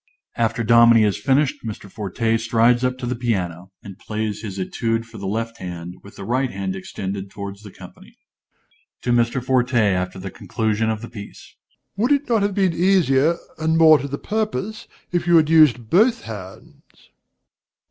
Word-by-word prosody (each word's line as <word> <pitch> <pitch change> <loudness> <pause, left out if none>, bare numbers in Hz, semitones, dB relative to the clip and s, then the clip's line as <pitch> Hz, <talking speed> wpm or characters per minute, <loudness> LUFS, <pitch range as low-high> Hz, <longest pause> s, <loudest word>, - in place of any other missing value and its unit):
(_After 115 0 0
Dominie 115 0 +6
has 105 -2 +2
finished, 135 +6 +1
Mr. 110 -2 -7
Forte 110 +3 -2
strides 115 +2 +2
up 125 0 0
to 130 - -6
the 125 +1 -2
piano, 95 -7 -3
and 100 -2 -11
plays 110 -1 -4
his 100 -3 -6
Etude 115 +4 -2
for 115 -1 -12
the 100 - -5
left 115 +3 -3
hand, 90 -1 -7
with 100 - -15
the - - -8
right 130 +5 0
hand 95 -2 -4
extended 95 +1 -6
towards 100 0 -8
the 105 - -11
company._) - - -15 0.9
DOMINIE 120 -1 +3
(to 120 - -7
Mr. - - -10
Forte, 130 -1 +1
after 95 -4 +1
the 95 +1 -7
conclusion 110 0 -1
of 110 0 -3
the - - -6
piece). 105 -4 -11 0.4
Would 235 +7 +1
it 285 0 +2
not 230 -3 +2
have 200 -1 0
been 190 -4 +2
easier 170 -4 +3 0.2
and 160 +1 +1
more 160 -2 +7
to 140 - -4
the 140 0 -4
purpose, 215 +1 -3 0.2
if 175 -1 -1
you 175 - +5
had 155 -1 +3
used 130 -8 +4
both 230 +6 +3
hands? 95 -4 -12
115 Hz, 180 wpm, -21 LUFS, 100-145 Hz, 0.9 s, more